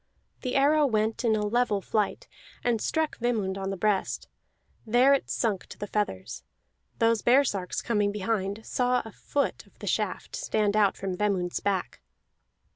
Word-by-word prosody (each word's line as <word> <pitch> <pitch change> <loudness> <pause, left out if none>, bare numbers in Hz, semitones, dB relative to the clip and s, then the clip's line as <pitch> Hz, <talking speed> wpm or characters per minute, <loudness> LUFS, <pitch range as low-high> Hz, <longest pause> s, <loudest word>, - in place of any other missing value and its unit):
The 255 -2 -3
arrow 290 +2 +4
went 220 0 0
in 225 -2 +3
a 210 -1 0
level 225 -1 +1
flight, 210 +1 -1 0.4
and 235 -3 +1
struck 320 -1 -1
Vemund 220 -6 0
on 195 0 -3
the 195 - -3
breast; 205 0 0 0.6
there 245 +5 +5
it 275 - 0
sunk 210 -6 -1
to - - -11
the - - -4
feathers. 205 - -3 0.5
Those 230 -1 +3
baresarks, 240 -8 +2
coming 210 -3 +1
behind, 205 0 -2
saw 250 0 +1
a 225 - -8
foot 280 +6 -2
of - - -26
the - - -8
shaft - - -2
stand 215 - 0
out 205 -2 +3
from 190 -1 -3
Vemund's 185 -3 0
back. 190 -10 -2
215 Hz, 160 wpm, -27 LUFS, 200-245 Hz, 0.6 s, there